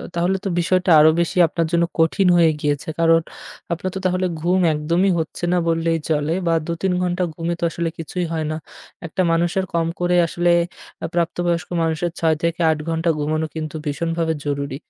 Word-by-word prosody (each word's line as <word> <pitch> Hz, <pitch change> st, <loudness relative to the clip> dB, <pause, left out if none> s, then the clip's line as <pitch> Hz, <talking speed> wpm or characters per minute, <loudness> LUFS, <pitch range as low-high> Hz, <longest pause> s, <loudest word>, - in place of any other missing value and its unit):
তাহলে 180 Hz, +3 st, +1 dB
তো 195 Hz, -, 0 dB
বিষয়টা 185 Hz, +2 st, +1 dB
আরও 155 Hz, -, +7 dB
বেশি 170 Hz, +1 st, -1 dB
আপনার 165 Hz, +1 st, -1 dB
জন্য 170 Hz, 0 st, +3 dB, 0.2 s
কঠিন 180 Hz, +4 st, +3 dB
হয়ে 165 Hz, -2 st, +5 dB
গিয়েছে। 145 Hz, +2 st, -1 dB
কারণ 165 Hz, 0 st, +4 dB, 0.5 s
আপনার 175 Hz, +3 st, -3 dB
তো 190 Hz, -, -2 dB
তাহলে 185 Hz, 0 st, +1 dB
ঘুম 175 Hz, +4 st, +1 dB
একদমই 170 Hz, +6 st, +1 dB
হচ্ছে 160 Hz, +2 st, -5 dB
না -, -, +3 dB
বললেই 165 Hz, 0 st, +1 dB
চলে 150 Hz, 0 st, +1 dB
বা 165 Hz, -, +3 dB
২ -, -, -2 dB
৩ 190 Hz, -1 st, +1 dB
ঘণ্টা 180 Hz, 0 st, 0 dB
ঘুমে 170 Hz, +2 st, -2 dB
তো -, -, -6 dB
আসলে 170 Hz, 0 st, -2 dB
কিছুই 175 Hz, +2 st, -3 dB
হয় 160 Hz, -1 st, -1 dB
না। 155 Hz, -, -2 dB, 0.5 s
একটা 165 Hz, +3 st, -2 dB
মানুষের 175 Hz, +3 st, +1 dB
কম 165 Hz, -1 st, +1 dB
করে 180 Hz, 0 st, +1 dB
আসলে 175 Hz, +1 st, 0 dB, 0.5 s
আ -, -, 0 dB
প্রাপ্তবয়স্ক 170 Hz, 0 st, -1 dB
মানুষের 165 Hz, +1 st, -1 dB
৬-৮ 165 Hz, 0 st, +1 dB
ঘণ্টা 165 Hz, +1 st, 0 dB
ঘুমানো 155 Hz, +2 st, -1 dB
কিন্তু 155 Hz, -1 st, -5 dB
ভীষণভাবে 165 Hz, +2 st, -1 dB
জরুরি। 140 Hz, -1 st, -2 dB
165 Hz, 175 wpm, -21 LUFS, 160-175 Hz, 0.5 s, আরও